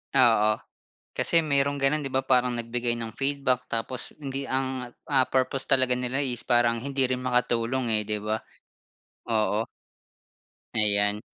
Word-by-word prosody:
Oo, 115 Hz, -5 st, +5 dB, 0.6 s
kasi 165 Hz, -1 st, +1 dB
merong 140 Hz, -2 st, 0 dB
gano'n, 145 Hz, +3 st, +2 dB
'di 135 Hz, -, -6 dB
ba? 130 Hz, -, +2 dB
Parang 125 Hz, -2 st, +2 dB
nagbigay 120 Hz, 0 st, -1 dB
ng 115 Hz, -1 st, -5 dB
feedback 135 Hz, -2 st, +1 dB
tapos 115 Hz, +2 st, -4 dB
hindi 135 Hz, 0 st, -3 dB
ang 130 Hz, -2 st, -3 dB, 0.2 s
ah, 130 Hz, -2 st, +3 dB
purpose 130 Hz, +1 st, 0 dB
talaga 130 Hz, -2 st, +4 dB
nila 125 Hz, +3 st, 0 dB
is 125 Hz, -4 st, -1 dB
parang 120 Hz, -1 st, +3 dB
hindi 135 Hz, +2 st, -2 dB
rin 125 Hz, -, 0 dB
makatulong 125 Hz, 0 st, 0 dB
eh, 105 Hz, -1 st, +3 dB
'di 105 Hz, 0 st, 0 dB
ba? 110 Hz, +1 st, -1 dB, 1.0 s
Oo. 110 Hz, 0 st, +1 dB, 1.1 s
Ayan. 105 Hz, -1 st, +2 dB
125 Hz, 145 wpm, -26 LUFS, 115-135 Hz, 1.1 s, Oo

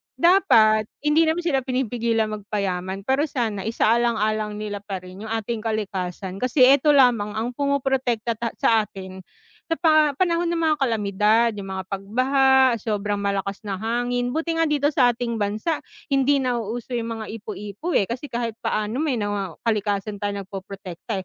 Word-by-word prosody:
Dapat 220 Hz, -, +4 dB, 0.2 s
hindi 310 Hz, +2 st, +4 dB
naman 335 Hz, +2 st, 0 dB
sila 285 Hz, -6 st, +2 dB
pinipigilang 235 Hz, -4 st, -1 dB
magpayaman 195 Hz, -2 st, -3 dB
pero 270 Hz, +6 st, +1 dB
sana 220 Hz, -7 st, -2 dB
isaalang-alang 215 Hz, -2 st, +1 dB
nila 210 Hz, -1 st, -4 dB
pa 195 Hz, -2 st, -6 dB
rin 190 Hz, +4 st, -9 dB
'yung 225 Hz, -, -3 dB
ating 225 Hz, 0 st, -2 dB
kalikasan 195 Hz, -3 st, -4 dB
kasi 255 Hz, +1 st, +3 dB
ito 285 Hz, +1 st, +4 dB
lamang 230 Hz, -6 st, +3 dB
ang 230 Hz, +3 st, -2 dB
pumoprotekta 265 Hz, -4 st, 0 dB
ta 230 Hz, -1 st, -3 dB
sa 220 Hz, -2 st, +2 dB
atin 190 Hz, -1 st, -9 dB, 0.5 s
sa 330 Hz, -, -1 dB
pa 310 Hz, -3 st, +4 dB
panahon 345 Hz, +2 st, +1 dB
ng 335 Hz, -1 st, -1 dB
mga 315 Hz, -1 st, +3 dB
kalamidad, 220 Hz, -2 st, +2 dB
'yung 195 Hz, -, -6 dB
mga 190 Hz, 0 st, -4 dB
pagbaha, 255 Hz, +5 st, +3 dB
sobrang 205 Hz, -1 st, -2 dB
malakas 200 Hz, 0 st, -2 dB
na 200 Hz, -, -3 dB
hangin, 245 Hz, +2 st, -1 dB
buti 325 Hz, +4 st, -1 dB
nga 320 Hz, -, +2 dB
dito 290 Hz, 0 st, +1 dB
sa 250 Hz, -4 st, +5 dB
ating 235 Hz, -2 st, -2 dB
bansa, 215 Hz, +10 st, -1 dB, 0.2 s
hindi 275 Hz, 0 st, +2 dB
nauuso 245 Hz, -1 st, -3 dB
yung 230 Hz, -1 st, -2 dB
mga 220 Hz, -, -6 dB, 0.2 s
ipu-ipo, 210 Hz, -, -6 dB
eh, 195 Hz, -, +2 dB
kasi 250 Hz, +6 st, -6 dB
kahit 235 Hz, -2 st, -2 dB
paano 215 Hz, +6 st, -1 dB
may 280 Hz, -6 st, 0 dB
nawaw 205 Hz, -5 st, -3 dB
kalikasan 205 Hz, -1 st, -1 dB
tayong 200 Hz, -1 st, -3 dB
nagpoprotekta, 195 Hz, +1 st, -7 dB
225 Hz, 160 wpm, -23 LUFS, 205-265 Hz, 0.5 s, sa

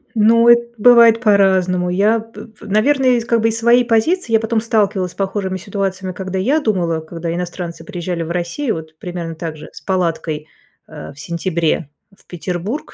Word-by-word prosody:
Ну 230 Hz, +2 st, +4 dB
эт 235 Hz, 0 st, +4 dB
бывает 230 Hz, 0 st, +6 dB
по-разному. 190 Hz, -4 st, +2 dB
Я 205 Hz, +5 st, +2 dB
п 225 Hz, +1 st, -11 dB
п 220 Hz, -2 st, -17 dB
наверное, 255 Hz, +6 st, +2 dB
я 245 Hz, -, +3 dB
из, 230 Hz, -, -3 dB
как 235 Hz, -1 st, +1 dB
бы, 225 Hz, -, +2 dB
из 225 Hz, -, -2 dB
своей 240 Hz, +1 st, +4 dB
позиции 235 Hz, +7 st, +1 dB
я 225 Hz, -, +5 dB
потом 225 Hz, 0 st, -1 dB
сталкивалась 205 Hz, -5 st, 0 dB
с -, -, -18 dB
похожими 195 Hz, -1 st, -2 dB
ситуациями, 190 Hz, -1 st, -4 dB
когда 190 Hz, 0 st, -4 dB
я 270 Hz, +11 st, +2 dB
думала, 180 Hz, -, 0 dB
когда 165 Hz, +1 st, -5 dB
иностранцы 175 Hz, -1 st, -5 dB
приезжали 175 Hz, -3 st, -4 dB
в 165 Hz, -, -6 dB
Россию, 180 Hz, +10 st, -2 dB
вот 160 Hz, -1 st, -9 dB
примерно 170 Hz, -1 st, -6 dB
так 160 Hz, -1 st, -6 dB
же 150 Hz, -, -11 dB
с -, -, -12 dB
палаткой, 165 Hz, -5 st, -2 dB, 0.4 s
э, 155 Hz, -1 st, -9 dB
в 140 Hz, -, -17 dB
сентябре, 170 Hz, -1 st, -2 dB, 0.3 s
в -, -, -27 dB
Петербург. 180 Hz, -, -5 dB
190 Hz, 185 wpm, -18 LUFS, 175-225 Hz, 0.4 s, бывает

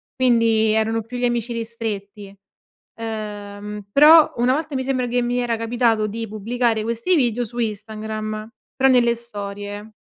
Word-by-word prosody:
quindi 230 Hz, -3 st, +3 dB
erano 220 Hz, +1 st, +1 dB
più 230 Hz, +3 st, -8 dB
gli 245 Hz, -, 0 dB
amici 240 Hz, -1 st, -1 dB
ristretti. 210 Hz, -3 st, -5 dB, 0.6 s
Uhm, 210 Hz, -2 st, -6 dB
però 305 Hz, +5 st, +7 dB
una 245 Hz, +2 st, +3 dB
volta 300 Hz, 0 st, -3 dB
mi 260 Hz, -, -1 dB
sembra 255 Hz, -2 st, -1 dB
che 245 Hz, +1 st, 0 dB
mi 245 Hz, +1 st, -1 dB
era 240 Hz, -1 st, 0 dB
capitato 230 Hz, -1 st, +1 dB
di 225 Hz, +2 st, -5 dB
pubblicare 220 Hz, +2 st, -1 dB
questi 235 Hz, +11 st, 0 dB
video 245 Hz, -5 st, +1 dB
su 235 Hz, +2 st, -10 dB
Instagram, 215 Hz, -1 st, -4 dB, 0.3 s
però 270 Hz, 0 st, +4 dB
nelle 240 Hz, -2 st, +4 dB
storie. 205 Hz, -2 st, -7 dB
225 Hz, 150 wpm, -21 LUFS, 215-245 Hz, 0.6 s, però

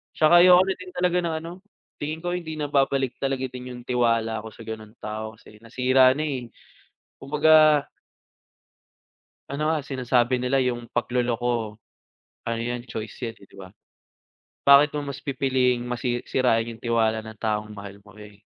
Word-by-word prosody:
'Tsaka 165 Hz, +3 st, +6 dB
ayoko 180 Hz, +1 st, +7 dB
rin 190 Hz, -1 st, -3 dB
din 185 Hz, 0 st, -10 dB
talaga 180 Hz, 0 st, +1 dB
ng 170 Hz, -2 st, -2 dB
ano, 170 Hz, -, -7 dB, 0.5 s
tingin 155 Hz, +3 st, -5 dB
ko 175 Hz, -, -2 dB
hindi 165 Hz, -3 st, -4 dB
na 145 Hz, -1 st, -4 dB
babalik 135 Hz, -2 st, +1 dB
talaga 135 Hz, -1 st, -2 dB
din 125 Hz, 0 st, -8 dB
'yung 120 Hz, -, -10 dB
tiwala 115 Hz, -3 st, 0 dB
ko 110 Hz, -, -9 dB
sa 110 Hz, +1 st, -12 dB
gano'ng 110 Hz, 0 st, -8 dB
tao 110 Hz, +1 st, -5 dB
kasi 105 Hz, 0 st, -18 dB
nasira 130 Hz, +3 st, +3 dB
na, 155 Hz, -, -2 dB
eh, 130 Hz, -5 st, -3 dB, 0.7 s
kumbaga 155 Hz, 0 st, +4 dB, 1.6 s
Ano 150 Hz, +3 st, -1 dB
nga, 160 Hz, -, +1 dB
sinasabi 125 Hz, -1 st, +1 dB
nila 125 Hz, +2 st, +1 dB
'yung 120 Hz, -2 st, -1 dB
pagloloko, 120 Hz, -3 st, -1 dB, 0.7 s
ano 115 Hz, 0 st, -2 dB
'yan 120 Hz, +1 st, -4 dB
choice 110 Hz, 0 st, -6 dB
'yan, 115 Hz, -1 st, -6 dB
eh, -, -, -14 dB
'di -, -, -19 dB
ba? 95 Hz, -1 st, -10 dB, 1.0 s
Bakit 140 Hz, +1 st, +7 dB
mo 145 Hz, -1 st, -3 dB
mas 135 Hz, -, -9 dB
pipiliing 130 Hz, -3 st, 0 dB
masi 120 Hz, 0 st, -3 dB
sirain 120 Hz, -3 st, +2 dB
'yung 115 Hz, -, -12 dB
tiwala 110 Hz, -1 st, +1 dB
ng 110 Hz, -1 st, -11 dB
taong 105 Hz, -1 st, -2 dB
mahal 100 Hz, 0 st, -10 dB
mo, 105 Hz, -1 st, -18 dB
eh, 105 Hz, -1 st, -13 dB
125 Hz, 165 wpm, -24 LUFS, 115-145 Hz, 1.6 s, ayoko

